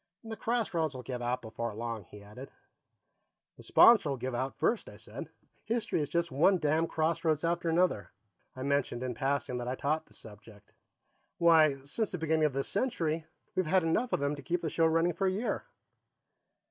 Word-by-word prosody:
"The 225 -1 -6
crossroads 185 - -1
will 125 - -7
give 125 +1 -5
out 120 +1 -2
before 115 0 -5
long," 115 -3 -5
he 105 +2 -13
added. 105 +7 -10 1.1
"The - - -14
sponsor'll 195 - +5
give 130 +1 -4
out 130 +3 -3
first," 230 - 0
I - - -12
said. - - -9 0.4
"History 230 -7 -1
is 145 - -3
just 170 +1 0
one 170 +8 +4
damn 160 +1 +1
crossroads 160 -1 0
after 170 0 0
another." 170 - +1 0.4
I 130 - -6
mentioned, 140 -3 0
in 125 -1 -2
passing, 135 0 -1
that 120 - -5
I 125 - -1
taught 155 +4 -1
the - - -18
subject. 105 -1 -14 0.6
"Why, 160 -4 +5
since 210 +9 -2
the 180 - -4
beginning 160 -1 +1
of 150 - +1
this 135 0 -2
century, 165 -9 -1 0.3
we've 185 -3 0
had 185 +2 +3
enough 220 +10 0
of - - +1
them 140 +1 0
to 145 - -9
keep 175 0 -2
the 160 - -3
show 165 -1 +3
running 165 +2 +2
for 195 +4 0
a - - +2
year." 210 +6 -2
155 Hz, 190 wpm, -31 LUFS, 130-170 Hz, 1.1 s, sponsor'll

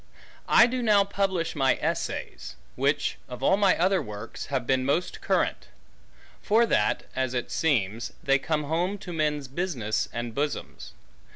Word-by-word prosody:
I 235 - +8
doe 250 +1 -2
now 210 -4 +5
publish 190 -4 -1
my 135 -3 +3
Essayes; - - -4 0.2
which, - - 0
of 125 +1 -7
all 190 - +5
my 200 -1 +3
other 185 +1 +2
workes, 105 -6 -7
have 130 -3 -2
beene 130 +1 +1
most 145 +7 -1
Currant: - - 0 0.7
For 225 +3 +4
that, 105 - +1
as 130 -1 -1
it 120 - -3
seemes, 115 - 0
they 135 0 +3
come 150 +1 -1
home, 175 +7 -1
to 185 -3 -8
Mens 150 -3 -1
Businesse, 130 - -2
and 120 -1 -4
Bosomes. 145 +3 -4
150 Hz, 155 wpm, -26 LUFS, 130-190 Hz, 0.7 s, I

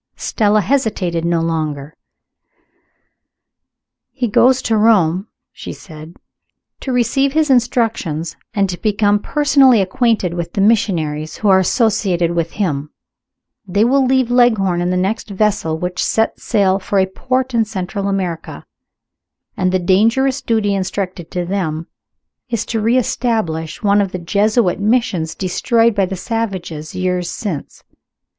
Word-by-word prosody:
Stella 215 -1 +1
hesitated 195 -8 -1
no 170 -1 +1
longer. 155 -2 -3 2.1
"He 250 -3 -2
goes 255 +4 +4
to 225 - +1
Rome," 200 -4 +3 0.2
she - - -8
said 155 0 -12 0.6
"to 265 - -4
receive 270 +3 +1
his 310 -2 +2
instructions, 225 - 0 0.2
and 200 -1 +2
to 175 - -8
become 205 -1 +2
personally 275 -2 +4
acquainted 195 -2 +1
with 170 -1 -5
the - - -3
missionaries 170 -8 0
who 210 - 0
are 190 -1 +6
associated 190 -4 +1
with 170 -1 -2
him. 150 -8 -2 0.8
They 200 +3 +2
will 270 +3 +3
leave 260 -1 +1
Leghorn 215 -8 +3
in 175 - 0
the 180 - 0
next 195 +4 -2
vessel 200 -5 0
which 180 +2 -3
sets 225 0 0
sail 195 -4 +2
for 200 +1 -2
a 190 - +4
port 255 +7 -2
in 230 -1 +3
Central 200 -1 -4
America. 185 -5 -4 0.9
And 185 -2 0
the 185 - +2
dangerous 230 +9 +2
duty 220 -3 0
intrusted 190 -2 -3
to 180 -1 -3
them 170 -4 -2 0.6
is 230 -3 -2
to 225 -2 -2
re 230 +4 +2
establish 215 -10 -2
one 205 0 +4
of 195 -2 -3
the - - -2
Jesuit 200 +3 +1
Missions 200 -7 0
destroyed 230 +5 +1
by 195 -2 +1
the 190 - -4
savages 180 -7 -4
years 180 -1 -1
since. 180 -10 -6
200 Hz, 140 wpm, -17 LUFS, 175-230 Hz, 2.1 s, are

